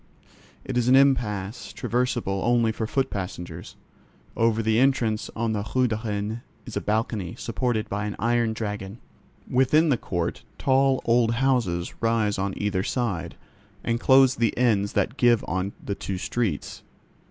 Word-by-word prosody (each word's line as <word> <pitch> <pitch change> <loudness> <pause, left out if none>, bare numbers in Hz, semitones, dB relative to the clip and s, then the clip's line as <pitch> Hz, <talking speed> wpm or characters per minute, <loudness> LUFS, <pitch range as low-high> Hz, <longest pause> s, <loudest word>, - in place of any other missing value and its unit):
It 125 - 0
is 120 - 0
an 130 - +6
"impasse"; 110 -6 +1
traversable 115 -2 -1
only 120 -1 +3
for 110 0 -3
foot 135 +3 0
passengers. 90 -3 -6 0.6
Over 115 -1 +2
the 110 +1 +2
entrance 120 -5 +1
on 115 0 -1
the 105 -1 -1
Rue 130 -1 +4
de 110 -1 -2
Rennes 105 +1 -2 0.3
is 120 - -8
a - - -1
balcony, 105 -4 -1
supported 115 -2 -1
by 105 +1 -3
an 105 - -4
iron 115 0 +1
dragon. 105 -2 -5 0.5
Within 150 +6 +3
the 130 - +3
court 85 -5 -3 0.2
tall 135 0 +2
old 115 -1 +3
houses 115 -10 0
rise 110 -3 +1
on 95 0 -2
either 100 -2 0
side, 105 -5 -2 0.5
and 115 0 0
close 130 +1 +6
the 115 -4 0
ends 105 -5 +2
that 120 - 0
give 120 -2 +3
on 95 +3 -2
the 100 - -2
two 95 -1 -4
streets. 100 -5 -2
115 Hz, 155 wpm, -25 LUFS, 100-125 Hz, 0.6 s, an